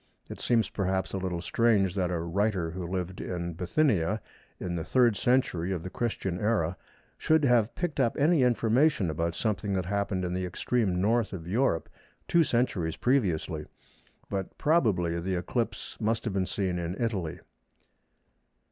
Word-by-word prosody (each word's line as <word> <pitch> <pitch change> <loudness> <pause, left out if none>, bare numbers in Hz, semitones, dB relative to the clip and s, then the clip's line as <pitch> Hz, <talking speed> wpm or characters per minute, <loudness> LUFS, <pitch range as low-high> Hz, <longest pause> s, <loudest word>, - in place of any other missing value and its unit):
It - - -7
seems, 115 -2 +2
perhaps, 95 -1 -1
a 95 - -1
little 90 -2 -3
strange 105 -6 +2
that 90 -2 0
a 90 - -1
writer 90 +1 0
who 90 0 -5
lived 90 0 -3
in 85 -1 -4
Bithynia 95 - +1 0.4
in 90 -1 -3
the 85 - -2
3rd 120 +7 +3
Century 110 -8 +1
of 90 -4 -2
the 90 - -6
Christian 95 -6 -2
Era 100 -6 +1 0.4
should 160 -1 +3
have 120 -3 +3
picked 175 -5 -3
up 120 -4 +2
any 155 +1 +4
information 120 - +3
about 85 +2 -2
something 105 -1 -1
that 95 -2 0
happened 100 -1 -1
in 90 - -2
the 90 0 -1
extreme 90 +1 0
North 110 +3 +1
of 85 -3 -6
Europe 105 -3 +1 0.4
two 170 -1 +4
centuries 110 - 0
previously. 90 - 0 0.6
But 95 -1 -4
probably 100 - +2
the 95 +2 -2
eclipse 115 +7 -3
must 110 +1 0
have 105 - -1
been 95 -1 0
seen 95 -3 -1
in 85 +2 -4
Italy. 100 -9 -2
95 Hz, 160 wpm, -28 LUFS, 90-115 Hz, 0.6 s, any